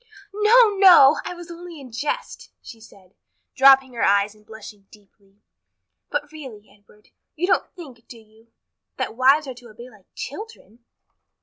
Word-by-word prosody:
"No, 430 +2 +4
no! 335 -7 +6
I 360 - -6
was 345 0 -12
only 340 -1 -11
in 260 -3 -13
jest," 295 - -6
she 230 - -14
said, 190 -3 -20 0.4
dropping 270 -1 +4
her 235 - -6
eyes 200 +1 +1
and 215 0 -24
blushing 210 -2 -14
deeply. 200 -1 -25 0.7
"But 295 0 -4
really, 260 -9 -12
Edward, 210 +1 -26 0.3
you 335 +3 -2
don't 380 - 0
think, 265 -10 -14
do 240 - -13
you, 220 +1 -23 0.5
that - - -5
wives 270 +5 +3
are 265 - -7
to 245 -1 -16
obey 240 +4 -14
like 205 -4 -23
children?" 280 - -11
250 Hz, 160 wpm, -21 LUFS, 215-310 Hz, 0.7 s, no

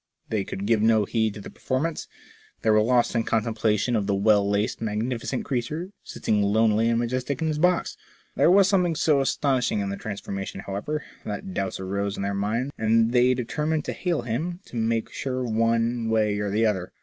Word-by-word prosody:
They 105 -3 0
could 95 +1 -5
give 110 0 +2
no 110 -1 +4
heed 110 -1 0
to 105 - -8
the - - -9
performance; 155 +5 -2 0.6
they 110 - +4
were 110 0 +5
lost 120 +2 +2
in 115 - +2
contemplation 110 +1 0
of 105 -3 0
the 100 - +1
well 100 0 +3
laced 105 +3 0
magnificent 115 +4 -2
creature, 150 +8 -3
sitting 105 -1 -1
lonely 110 +2 +3
and 115 - +2
majestic 125 +3 -2
in 160 - 0
his 150 -1 -2
box. 180 +1 +1 0.4
There - - +4
was 195 +1 +6
something 180 -4 +2
so 150 -2 +3
astonish 135 -2 +1
ing - - 0
in 100 -1 -2
the 100 - -4
transformation, 100 -2 -5
however, 105 +12 -4 0.2
that 100 -2 -5
doubts 95 0 -2
arose 100 +1 -2
in - - -3
their 100 0 -1
minds, 110 +7 -1
and 115 +1 +3
they 125 +1 +4
determined 150 +5 -2
to - - -3
hail 170 -8 -1
him, 160 +10 -3
to - - -12
make 115 0 0
sure 130 -1 -3
one 115 0 +1
way 105 -2 +1
or 105 0 -1
the 110 +3 +2
other. 95 -4 -1
115 Hz, 195 wpm, -25 LUFS, 105-130 Hz, 0.6 s, was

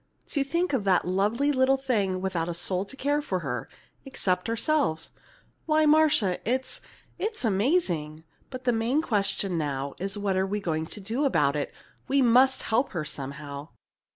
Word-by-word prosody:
To 280 - +1
think 335 +3 -1
of 250 -6 +1
that 185 -2 +3
lovely 210 +10 +1
little 265 0 +3
thing 205 -9 0
without 175 -3 -1
a 170 - -3
soul 185 +2 -1
to 270 - -10
care 290 +2 0
for 185 -10 -2
her 130 -5 -4 0.3
except 185 -7 -1
ourselves. 230 - 0 0.6
Why, 310 0 +4
Marcia, 300 - +4
it's 260 +3 -2 0.4
it's 425 - -2
amazing! 190 - 0 0.3
But 255 -1 -7
the 245 - +2
main 235 +7 +1
question 195 - 0
now 140 -2 -2
is 195 +2 -3
what 200 -2 0
are 190 +1 +1
we 205 +2 -2
going 160 -4 -2
to 210 - -8
do 225 +8 -2
about 150 - +2
it? 145 - -2 0.4
We 275 - +2
must 260 +2 +4
help 245 +5 0
her 160 -4 -2
somehow!" 140 +1 -7
205 Hz, 170 wpm, -27 LUFS, 175-270 Hz, 0.6 s, Why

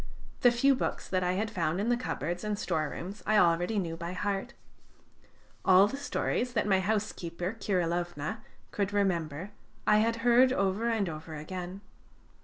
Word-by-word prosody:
The 245 - +6
few 240 +4 +4
books 255 - -2
that 185 -1 0
I 180 0 +1
had 210 +3 -1
found 175 -3 -1
in 215 +4 0
the 245 - +4
cupboards 175 -8 -3
and 210 -1 -1
storerooms 175 +2 -3
I 215 - +4
already 175 +2 +3
knew 170 -4 -1
by 170 +1 -5
heart. 205 +6 -3 1.1
All 190 +1 +7
the 210 - -3
stories 255 -3 -1
that 230 - +1
my 190 -2 +4
housekeeper 190 -2 -2
Kirilovna 175 -1 -1 0.3
could 200 -1 -1
remember 180 -3 -1 0.3
I 210 0 +5
had 230 +1 +2
heard 245 +2 +6
over 200 0 +1
and 220 -4 +1
over 160 0 -6
again. 180 +5 -6
195 Hz, 160 wpm, -30 LUFS, 175-215 Hz, 1.1 s, All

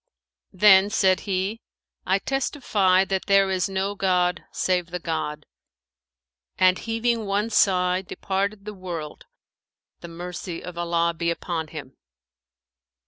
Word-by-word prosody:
Then 195 0 +6
said 190 -2 +2
he, 195 +4 -1 0.5
'I 190 +1 +3
testify 210 -9 +1
that 190 0 -2
there 195 -1 +4
is 185 +1 0
no 195 +1 -1
god 180 -3 +1
save 180 -2 0
the 180 +1 -4
God;' 155 -3 -4 1.1
and, 185 0 +4
heaving 230 -1 -1
one 205 +3 0
sigh, 180 -2 +3
departed 200 +2 -3
the 210 - -6
world 175 -6 -7 0.7
the 170 - -9
mercy 175 0 -7
of 180 - -8
Allah 170 0 0
be 170 +1 -1
upon 170 -1 -3
him! 145 -4 -10
185 Hz, 125 wpm, -24 LUFS, 175-200 Hz, 1.1 s, Then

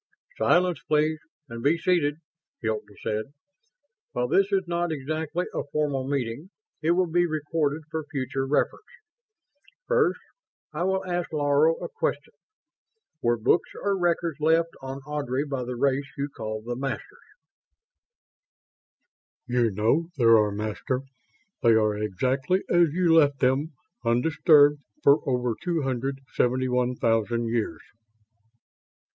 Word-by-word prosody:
"Silence, 180 - +2
please, 155 +1 +2 0.3
and 115 -2 -7
be 145 +6 +3
seated," 165 -4 +1 0.5
Hilton 110 -2 -3
said. 110 0 -1 0.9
"While 125 0 0
this 195 +6 +3
is 195 -1 +2
not 170 0 -1
exactly 155 +4 -3
a - - -1
formal 145 -4 -1
meeting, 140 +3 -3 0.3
it 165 +2 +3
will 185 +1 +2
be 175 +1 +2
recorded 155 -1 -1
for 160 0 -3
future 135 0 -2
reference. 145 - 0 1.1
First, 485 -3 +2 0.5
I 170 +4 -1
will 190 0 0
ask 175 -1 -2
Laro 150 +1 +3
a - - -6
question. 460 - -3 0.9
Were 120 -1 +2
books 115 +9 +2
or 200 -1 0
records 170 -4 0
left 165 +2 +3
on 135 +1 -6
Ardry 145 -2 -2
by 135 -3 -3
the 125 0 -4
race 140 +2 0
you 140 +1 -2
call 110 -1 -5
the 120 +1 -4
Masters?" 135 +2 -5 2.3
"You 120 -2 +2
know 110 - +1
there 115 -3 +6
are, 105 -2 +3
Master. 110 +5 -3 0.6
They 115 -2 +5
are 110 -1 +2
exactly 130 - 0
as 175 -1 +5
you 170 0 +2
left 145 -4 +5
them. 135 +5 +1 0.3
Undisturbed 145 +4 +4 0.2
for 140 +2 +6
over 125 -2 0
two 170 -4 -1
hundred 135 +1 -2
seventy 130 +1 +1
one 125 0 +1
thousand 115 0 0
years." 115 -1 -2
140 Hz, 130 wpm, -26 LUFS, 125-165 Hz, 2.3 s, there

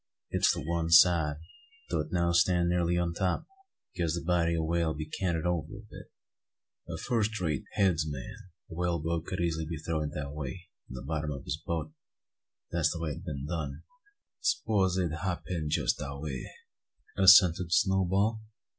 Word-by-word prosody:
It's - - +3
to - - -4
one 85 0 -1
side, 80 -2 +6 0.6
though - - +1
it 75 +1 -3
now 85 -1 +1
stand 85 0 +3
nearly 85 0 +1
on 85 -1 0
top; 90 +1 -1 0.5
because 85 -1 -1
the 85 - -4
body 85 -1 +2
o' 80 - 0
the - - -2
whale 80 -1 0
be 75 0 -4
canted 80 0 -2
over 85 +1 -1
a 100 - -9
bit. - - -11 0.8
A - - -4
first 110 -2 -1
rate 80 -6 -1
`_heads 90 -6 +2
man_' 70 -4 -6 0.4
o' - - -6
a - - -8
whale 90 -1 0
boat 80 +2 -2
could 95 - -3
easily 80 -2 -1
a' 80 0 -4
throwed 80 -2 -1
it 75 - -9
that 70 -1 -4
way 75 +5 -6 0.2
from 65 - -9
the - - -7
bottom 75 +1 -2
o' 70 -1 -6
his 75 - -4
boat, 80 -2 -3 0.8
and 85 - -1
that's 80 -1 +3
the 85 - -4
way 80 -2 -2
it 80 - -7
ha' - - -13
been 70 -3 -4
done." 80 -3 -4 0.6
"Spose 100 - +1
'im 90 -4 0
hab 90 +3 -3
been 80 -4 -3
jest 75 - +1
dat 70 -1 -5
way," 70 -4 -5 0.7
assented 90 -3 +7
Snowball. 95 +2 +2
85 Hz, 195 wpm, -30 LUFS, 80-90 Hz, 0.8 s, assented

